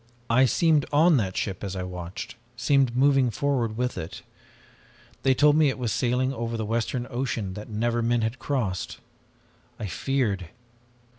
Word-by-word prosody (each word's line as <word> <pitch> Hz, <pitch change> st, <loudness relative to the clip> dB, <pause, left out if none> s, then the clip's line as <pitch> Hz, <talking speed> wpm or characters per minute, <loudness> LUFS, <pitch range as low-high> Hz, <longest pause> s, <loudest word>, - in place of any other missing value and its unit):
I 130 Hz, +3 st, +6 dB
seemed 155 Hz, +2 st, +3 dB
on 155 Hz, +2 st, +5 dB
that 95 Hz, -6 st, -1 dB
ship 95 Hz, -2 st, -3 dB
as 95 Hz, -1 st, -4 dB
I 95 Hz, -, -3 dB
watched, 90 Hz, -1 st, -6 dB, 0.2 s
seemed 130 Hz, 0 st, +2 dB
moving 135 Hz, -1 st, +4 dB
forward 115 Hz, -1 st, -1 dB
with 125 Hz, 0 st, -1 dB
it. 80 Hz, -, -7 dB, 1.0 s
They 135 Hz, -1 st, +3 dB
told 150 Hz, +2 st, +5 dB
me 155 Hz, -2 st, +5 dB
it 130 Hz, -, -3 dB
was 120 Hz, -4 st, -2 dB
sailing 125 Hz, +2 st, +1 dB
over 115 Hz, -2 st, -3 dB
the 110 Hz, -, -2 dB
western 115 Hz, +2 st, -1 dB
ocean 120 Hz, -6 st, -2 dB
that 105 Hz, +4 st, -8 dB
never 115 Hz, +2 st, 0 dB
men 120 Hz, 0 st, +1 dB
had 115 Hz, +3 st, -2 dB
crossed. 115 Hz, -10 st, -2 dB, 0.8 s
I -, -, -3 dB
feared! 100 Hz, -2 st, -1 dB
120 Hz, 160 wpm, -26 LUFS, 105-135 Hz, 1.0 s, I